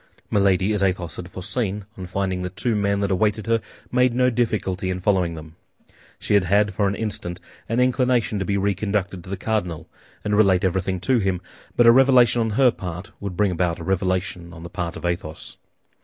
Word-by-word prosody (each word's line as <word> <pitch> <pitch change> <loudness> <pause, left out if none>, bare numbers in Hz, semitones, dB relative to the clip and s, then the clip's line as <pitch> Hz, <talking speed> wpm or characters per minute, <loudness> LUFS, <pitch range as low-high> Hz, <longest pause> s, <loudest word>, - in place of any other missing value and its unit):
Milady, 100 0 +3
as 105 - 0
Athos 90 -4 -1
had 85 - -7
foreseen, 100 +2 -3
on 95 -1 -7
finding 95 0 -2
the 90 - -3
two 100 +6 -2
men 100 -1 +1
that 100 0 0
awaited 105 +2 +1
her, 115 0 +1 0.3
made 125 -1 +3
no 125 0 +3
difficulty 105 -6 -1
in 90 0 -2
following 90 -3 +1
them. 80 0 -11 0.6
She - - -2
had 100 -3 +4
had 100 +3 +2
for 100 +1 +1
an 100 - -1
instant 95 -5 -3 0.3
an 115 +2 +1
inclination 125 -4 +2
to 95 - -2
be 100 - 0
reconducted 100 -1 -1
to - - -12
the 100 - -3
cardinal, 90 -8 -2 0.4
and 105 0 0
relate 95 -4 +4
everything 95 0 0
to 125 +5 +2
him; 95 -3 0 0.4
but 120 - +5
a 115 - +9
revelation 125 -2 +5
on 110 - 0
her 130 -3 +6
part 90 0 -7
would 100 -3 -6
bring 100 -1 +2
about 85 -1 0
a 85 - -8
revelation 90 -1 -1
on 80 0 -10
the 85 - -7
part 85 -1 -4
of - - -7
Athos. 85 -2 -4
100 Hz, 200 wpm, -23 LUFS, 90-110 Hz, 0.6 s, a